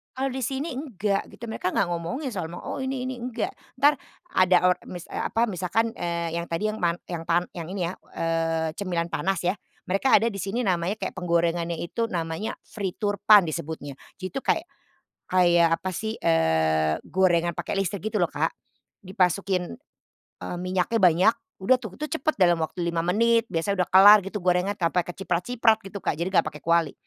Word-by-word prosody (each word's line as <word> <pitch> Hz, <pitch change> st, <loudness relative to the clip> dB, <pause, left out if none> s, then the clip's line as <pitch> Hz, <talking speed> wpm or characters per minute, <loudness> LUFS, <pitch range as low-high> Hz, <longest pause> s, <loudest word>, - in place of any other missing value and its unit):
Kalau 265 Hz, +1 st, -1 dB
di 265 Hz, -, -3 dB
sini 270 Hz, +6 st, -2 dB
enggak 210 Hz, -, -2 dB
gitu. 235 Hz, -, -9 dB
Mereka 205 Hz, -4 st, -2 dB
enggak -, -, +1 dB
ngomongin 175 Hz, -, -3 dB
soal 180 Hz, -7 st, -3 dB
ma 175 Hz, -, -7 dB
"Oh -, -, -5 dB
ini 265 Hz, -1 st, -3 dB
ini." 260 Hz, -, -4 dB
enggak. 245 Hz, 0 st, -3 dB, 0.3 s
Entar, 290 Hz, +2 st, +5 dB, 0.4 s
ada 185 Hz, 0 st, +5 dB
o -, -, +6 dB, 0.2 s
mis 175 Hz, -2 st, -8 dB
eee, -, -, -5 dB
apa, 230 Hz, +2 st, +1 dB
misalkan, 200 Hz, +4 st, 0 dB
eee, 170 Hz, -1 st, -3 dB
yang 170 Hz, -, -1 dB
tadi, 170 Hz, +6 st, -1 dB
yang -, -, -6 dB
man 170 Hz, -1 st, +1 dB
yang 170 Hz, -2 st, -5 dB
tan 175 Hz, +1 st, +2 dB
yang 170 Hz, -2 st, -5 dB
ini 185 Hz, -3 st, -2 dB
ya, 175 Hz, -, -4 dB, 0.2 s
eee, 165 Hz, -1 st, 0 dB
cemilan 175 Hz, -4 st, -2 dB
panas 190 Hz, +4 st, 0 dB
ya. 185 Hz, -, +1 dB, 0.3 s
Mereka 195 Hz, +8 st, +3 dB
ada 230 Hz, -, +2 dB
di 210 Hz, -, -9 dB
sini 195 Hz, +5 st, -3 dB
namanya 185 Hz, -2 st, 0 dB
kayak -, -, -4 dB
penggorengannya 170 Hz, -1 st, 0 dB
itu, 230 Hz, +7 st, -3 dB
namanya 165 Hz, +3 st, -3 dB
frituurpan 205 Hz, -1 st, +3 dB
disebutnya. 150 Hz, -2 st, -5 dB, 0.2 s
Jadi 185 Hz, -, -4 dB
itu 270 Hz, -, -3 dB
kayak -, -, +1 dB, 0.6 s
kayak 175 Hz, -2 st, +5 dB
apa 190 Hz, -, -4 dB
sih, 220 Hz, +5 st, -3 dB
eee, 80 Hz, -1 st, +2 dB
gorengan 175 Hz, -2 st, +2 dB
pakai -, -, -4 dB
listrik, 195 Hz, +1 st, -2 dB
gitu 215 Hz, -, 0 dB
loh, 175 Hz, -, +3 dB
Kak. 150 Hz, +3 st, 0 dB, 0.6 s
Dimasukin, 185 Hz, +1 st, 0 dB, 0.6 s
eee, 175 Hz, -, -5 dB
minyaknya 185 Hz, +5 st, 0 dB
banyak, 185 Hz, +3 st, +5 dB, 0.3 s
udah 255 Hz, +7 st, +4 dB
tuh. 220 Hz, -6 st, -9 dB
Itu 305 Hz, 0 st, -5 dB
cepet 310 Hz, +4 st, 0 dB
dalam 175 Hz, -2 st, +5 dB
waktu 160 Hz, +2 st, -3 dB
5 170 Hz, -1 st, 0 dB
menit. 230 Hz, +5 st, +3 dB
Biasanya 180 Hz, +3 st, 0 dB
udah -, -, -29 dB
kelar, 205 Hz, +3 st, +10 dB
gitu. 200 Hz, +1 st, -5 dB
Gorengan 180 Hz, +2 st, +2 dB
tanpa 175 Hz, -1 st, 0 dB
keciprat-ciprat 220 Hz, +6 st, +1 dB
gitu, 195 Hz, 0 st, -7 dB
Kak. -, -, -1 dB
Jadi 170 Hz, +2 st, -1 dB
enggak -, -, +4 dB
pakai 150 Hz, -, -12 dB
kuali. 170 Hz, -3 st, +2 dB
180 Hz, 185 wpm, -25 LUFS, 170-215 Hz, 0.6 s, kelar